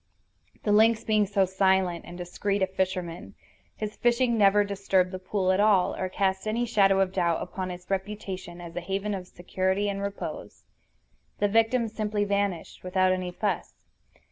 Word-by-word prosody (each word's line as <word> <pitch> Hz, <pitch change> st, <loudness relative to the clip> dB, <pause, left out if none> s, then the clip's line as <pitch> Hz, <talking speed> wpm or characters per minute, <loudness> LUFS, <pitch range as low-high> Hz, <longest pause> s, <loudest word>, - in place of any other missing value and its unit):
The 210 Hz, -, +1 dB
lynx 220 Hz, +2 st, +4 dB
being 215 Hz, -2 st, +2 dB
so 195 Hz, -1 st, +2 dB
silent 190 Hz, -2 st, +1 dB
and 175 Hz, -, -9 dB
discreet 195 Hz, +3 st, -2 dB
a -, -, +5 dB
fisherman, 185 Hz, -2 st, -3 dB, 0.4 s
his 215 Hz, 0 st, -5 dB
fishing 240 Hz, 0 st, +2 dB
never 205 Hz, -1 st, +5 dB
disturbed 195 Hz, -2 st, +1 dB
the 185 Hz, -, -5 dB
pool 185 Hz, 0 st, 0 dB
at 185 Hz, -, +1 dB
all, 205 Hz, -3 st, +3 dB
or 185 Hz, -, -3 dB
cast 190 Hz, +1 st, -1 dB
any 230 Hz, +3 st, 0 dB
shadow 195 Hz, -4 st, +3 dB
of 190 Hz, -1 st, 0 dB
doubt 170 Hz, -3 st, +1 dB
upon 185 Hz, -1 st, -5 dB
its 180 Hz, 0 st, -8 dB
reputation 190 Hz, -3 st, -4 dB
as 170 Hz, -1 st, -9 dB
a 175 Hz, -, -2 dB
haven 195 Hz, +3 st, -2 dB
of 185 Hz, -2 st, -5 dB
security 190 Hz, +3 st, -1 dB
and 200 Hz, 0 st, -3 dB
repose. 200 Hz, 0 st, -6 dB, 0.7 s
The 205 Hz, -, +2 dB
victim 225 Hz, +2 st, +2 dB
simply 215 Hz, -1 st, -2 dB
vanished, 200 Hz, -4 st, -2 dB
without 185 Hz, 0 st, +2 dB
any 185 Hz, -1 st, -1 dB
fuss. 205 Hz, +3 st, -2 dB
195 Hz, 170 wpm, -27 LUFS, 185-210 Hz, 0.7 s, a